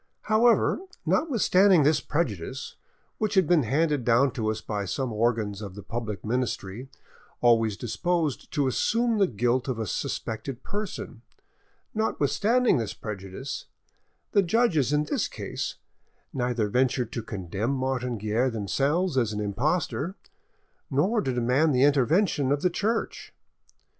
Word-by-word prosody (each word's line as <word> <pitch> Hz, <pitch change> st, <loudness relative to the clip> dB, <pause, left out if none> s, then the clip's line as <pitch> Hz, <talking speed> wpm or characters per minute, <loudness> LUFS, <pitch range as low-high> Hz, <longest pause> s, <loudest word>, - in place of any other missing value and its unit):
However, 225 Hz, +1 st, +3 dB, 0.3 s
notwithstanding 200 Hz, -, +4 dB
this 150 Hz, +1 st, +3 dB
prejudice, 130 Hz, -, -3 dB, 0.4 s
which 215 Hz, -2 st, 0 dB
has 190 Hz, -2 st, +5 dB
been 165 Hz, 0 st, +4 dB
handed 145 Hz, +3 st, +1 dB
down 125 Hz, +3 st, +4 dB
to 110 Hz, -2 st, -2 dB
us 110 Hz, 0 st, -2 dB
by 105 Hz, -2 st, -3 dB
some 120 Hz, +5 st, -3 dB
organs 110 Hz, -2 st, 0 dB
of 100 Hz, -3 st, -7 dB
the 100 Hz, -, -9 dB
public 110 Hz, -5 st, -5 dB
ministry 120 Hz, 0 st, -3 dB, 0.5 s
always 115 Hz, -4 st, +3 dB
disposed 160 Hz, -, -1 dB
to 145 Hz, -, +1 dB
assume 230 Hz, -, +1 dB
the 195 Hz, -, +4 dB
guilt 120 Hz, -, 0 dB
of 130 Hz, -3 st, -2 dB
a 110 Hz, -, -2 dB
suspected 115 Hz, +5 st, -4 dB
person,—notwithstanding 225 Hz, -, -2 dB
this 110 Hz, -3 st, -4 dB
prejudice, 105 Hz, +5 st, -6 dB, 0.7 s
the 200 Hz, -, +5 dB
judges 180 Hz, -, +2 dB
in 150 Hz, 0 st, +2 dB
this 150 Hz, -, -1 dB
case -, -, -5 dB, 0.6 s
neither 125 Hz, -4 st, 0 dB
ventured 125 Hz, +1 st, +1 dB
to 120 Hz, -, -3 dB
condemn 100 Hz, +1 st, -4 dB
Martin 130 Hz, -3 st, -1 dB
Guerre 110 Hz, +5 st, 0 dB
themselves 135 Hz, -, 0 dB
as 115 Hz, -3 st, 0 dB
an 105 Hz, -, -3 dB
impostor, 150 Hz, -, -1 dB, 0.7 s
nor 185 Hz, -, +2 dB
to 130 Hz, -, -1 dB
demand 125 Hz, +5 st, +2 dB
the 125 Hz, -, +4 dB
intervention 145 Hz, -, +3 dB
of 145 Hz, 0 st, 0 dB
the 180 Hz, -, +3 dB
Church. 220 Hz, +6 st, -2 dB
130 Hz, 135 wpm, -26 LUFS, 115-175 Hz, 0.7 s, has